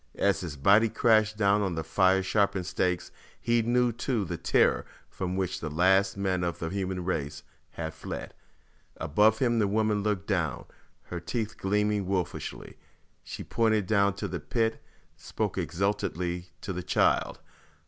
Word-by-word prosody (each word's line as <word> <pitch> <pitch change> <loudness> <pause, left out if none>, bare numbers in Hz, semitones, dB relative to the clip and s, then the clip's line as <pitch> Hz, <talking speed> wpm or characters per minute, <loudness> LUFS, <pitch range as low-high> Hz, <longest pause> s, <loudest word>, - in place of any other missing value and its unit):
As 100 -1 +2
his 80 -5 -6
body 100 +10 +5
crashed 110 -2 +3
down 100 -1 +3
on 95 -4 -1
the 80 - -2
fire 95 +4 +3
sharpened 95 -1 +1
stakes, 90 -1 -1 0.3
he 120 0 +2
knew 120 +1 +2
too 115 -2 -2
the - - -4
terror - - +2 0.3
from 90 0 -3
which 95 -2 -2
the 75 - -4
last 95 +5 +3
men 95 -2 0
of 85 -1 -2
the 80 - -4
human 95 -1 -3
race 75 -5 -3 0.3
had 80 -1 -5
fled. 80 - -7 0.6
Above 105 +8 +3
him 120 -2 +1
the 105 - +3
woman 105 0 +1
looked 100 -2 -1
down, 85 - -1 0.4
her 90 - -6
teeth 105 +6 -3
gleaming 105 0 0
wolfishly. 95 -3 -4 0.5
She - - -7
pointed 110 -3 +1
down 100 -1 +3
into 100 +1 -4
the 90 -2 -4
pit; 110 +10 -1 0.4
spoke - - -3
exultantly 90 -2 -2
to 95 - -4
the 90 - -4
child. - - +1
95 Hz, 160 wpm, -28 LUFS, 90-105 Hz, 0.6 s, body